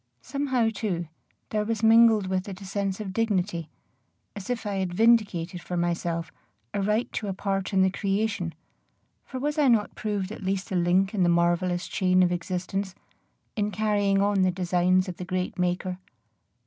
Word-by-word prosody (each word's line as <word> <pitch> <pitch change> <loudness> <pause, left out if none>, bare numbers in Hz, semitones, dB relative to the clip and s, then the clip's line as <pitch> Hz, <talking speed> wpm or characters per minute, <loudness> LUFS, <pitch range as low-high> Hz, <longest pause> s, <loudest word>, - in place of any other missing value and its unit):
Somehow, 260 -5 0
too, 180 -6 -2 0.4
there 210 -1 +1
was 225 0 -2
mingled 225 -2 +6
with 185 +1 -2
it 190 -1 -7
a 200 - -9
sense 195 0 -2
of 195 -3 -5
dignity, 190 -7 -1 0.7
as 200 0 -8
if 245 -2 -2
I 200 -1 -2
had 185 -2 -2
vindicated 200 -6 +2
for 180 - -4
myself 170 -1 -1 0.4
a 200 - -1
right 210 +4 0
to 210 - -3
a 195 - -3
part 195 -1 -2
in 190 -1 +4
the 190 - +3
creation; 200 -3 -1 0.7
for 260 - -6
was 295 +3 -1
I 290 - +4
not 225 -4 +3
proved 205 -2 -3
at 220 - -8
least 190 0 -2
a - - -1
link 180 +3 +2
in 200 - 0
the 175 - +4
marvellous 175 +1 +1
chain 185 -1 +3
of 175 - +2
existence, 185 +2 -3 0.6
in 210 -1 0
carrying 205 -1 +1
on 200 -1 +2
the 185 - +4
designs 180 +1 +2
of 180 - -6
the - - -5
great 185 0 -3
Maker? 180 +1 -1
195 Hz, 180 wpm, -26 LUFS, 180-210 Hz, 0.7 s, mingled